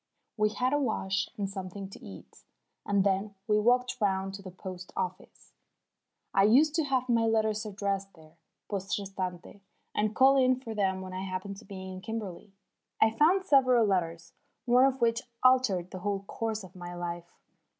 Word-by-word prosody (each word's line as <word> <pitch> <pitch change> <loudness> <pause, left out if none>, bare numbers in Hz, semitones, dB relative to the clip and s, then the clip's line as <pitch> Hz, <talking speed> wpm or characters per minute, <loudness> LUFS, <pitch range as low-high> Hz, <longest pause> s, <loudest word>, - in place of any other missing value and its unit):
We 215 -1 +2
had 250 +5 0
a 290 - +3
wash 195 -7 -1
and 200 -2 -1
something 195 0 -6
to - - -12
eat, 95 -1 -12 0.4
and 200 -1 +3
then 200 +1 0
we 210 -1 +3
walked 250 +2 +2
round 195 -1 0
to 195 - -7
the 190 - -8
post 185 0 -9
office. 185 0 -5 0.8
I 195 - +4
used 265 +10 +5
to 320 -1 +1
have 260 -2 0
my 230 -2 +3
letters 220 -1 +1
addressed 195 -1 -3
there, 160 0 -19 0.3
poste 195 -1 -2
restante, 190 -1 -6 0.3
and 215 +1 0
call 270 +1 +6
in 255 -1 +4
for 230 -4 -6
them 190 -3 0
when 185 0 -7
I 185 - -4
happened 190 +1 -5
to 220 - -13
be 190 -2 -8
in 185 0 -8
Kimberley. 205 -3 -6 0.5
I 220 - +5
found 340 - +3
several 255 -7 +5
letters, 170 -4 -1 0.3
one 250 +1 +5
of 265 -1 0
which 230 0 +2 0.2
altered 240 -9 +3
the 185 - -6
whole 200 +1 -2
course 220 +1 -3
of 185 - -13
my 175 -1 -7
life. 175 0 -6
200 Hz, 180 wpm, -29 LUFS, 190-230 Hz, 0.8 s, call